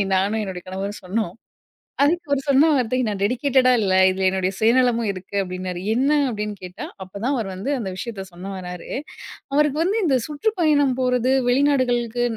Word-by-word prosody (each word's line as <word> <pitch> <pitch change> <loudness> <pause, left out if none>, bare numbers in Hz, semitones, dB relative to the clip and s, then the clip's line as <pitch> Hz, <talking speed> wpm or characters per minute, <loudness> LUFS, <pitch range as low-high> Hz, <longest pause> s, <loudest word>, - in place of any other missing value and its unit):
நானும் 200 +4 +1
என்னுடைய 190 -3 -5
கணவரும் 195 +2 -4
சொன்னோம். 190 0 -2 0.7
அதுக்கு 340 +2 +1
அவரு 280 - +2
சொன்ன 280 +4 +5
வார்த்தை, 255 -1 0
நா 210 - -1
டெடிகேட்டடா 255 +3 +3
இல்ல, 190 -2 +2 0.2
இதுல 190 0 0
என்னுடைய 190 0 -1
சுயநலமும் 235 -1 +3
இருக்கு. 185 +1 -9
அப்படின்னாரு. 185 -1 -5 0.2
என்ன? 265 +4 +2 0.2
அப்டின்னு 210 -2 -4
கேட்டா 180 0 -7 0.2
அப்ப 185 - -22
தான் 260 - +1
அவர் 220 -6 -2
வந்து 205 +10 -3
அந்த 205 -5 -3
விஷயத்த 200 -3 -5
சொல்ல 180 +2 -10
வராரு, 180 -1 -8 0.6
அவருக்கு 300 0 +2
வந்து 410 +5 +1
இந்த 270 -4 +3
சுற்றுப்பயணம் 300 - +1
போறது 250 0 +2 0.2
வெளிநாடுகளுக்கு 245 -3 +2
235 Hz, 160 wpm, -22 LUFS, 190-270 Hz, 0.7 s, சொன்ன